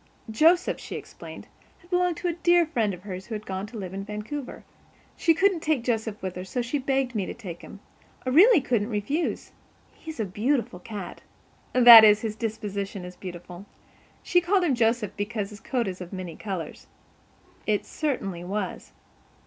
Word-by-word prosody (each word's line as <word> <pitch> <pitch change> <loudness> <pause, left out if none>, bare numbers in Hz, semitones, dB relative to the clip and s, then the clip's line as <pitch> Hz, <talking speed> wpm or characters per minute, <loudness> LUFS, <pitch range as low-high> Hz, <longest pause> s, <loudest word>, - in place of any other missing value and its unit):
Joseph, 330 +10 +3
she - - -7
explained, - - -9 0.3
had 345 - -24
belonged 355 -2 +1
to 360 - -3
a 345 - 0
dear 345 0 +3
friend 235 -10 0
of 180 - -17
hers 190 -2 -7
who 225 - -4
had 210 0 -7
gone 190 +1 -4
to 225 +2 -9
live 190 -3 -6
in 195 0 -4
Vancouver. 210 +7 -6 0.5
"She 330 -2 +3
couldn't 380 +1 +3
take 310 -6 0
Joseph 220 -3 -2
with 185 -1 -4
her 180 - -5
so 215 +7 -3
she 255 +5 -2
begged 265 -1 0
me 200 -5 -2
to - - -6
take 180 -8 -8
him. - - -12 0.4
I - - 0
really 345 - +7
couldn't 235 -4 0
refuse. 245 +10 -2 0.4
He's 320 -5 -10
a 220 - 0
beautiful 220 +1 -1
cat—that 225 +4 +5
is, 210 0 +6
his 220 -2 -3
disposition 205 -4 -4
is 180 0 -9
beautiful. 180 +1 -9 0.6
She 355 - +3
called 370 +2 +2
him 315 -6 +2
Joseph 230 -3 +1
because 205 0 -3
his 205 - -11
coat 240 0 -2
is 185 -1 -5
of 180 - -8
many 185 -4 -6
colors." 185 -7 -6 0.8
It 210 -1 +1
certainly 195 - -3
was. 195 +1 -4
220 Hz, 180 wpm, -26 LUFS, 195-280 Hz, 0.8 s, really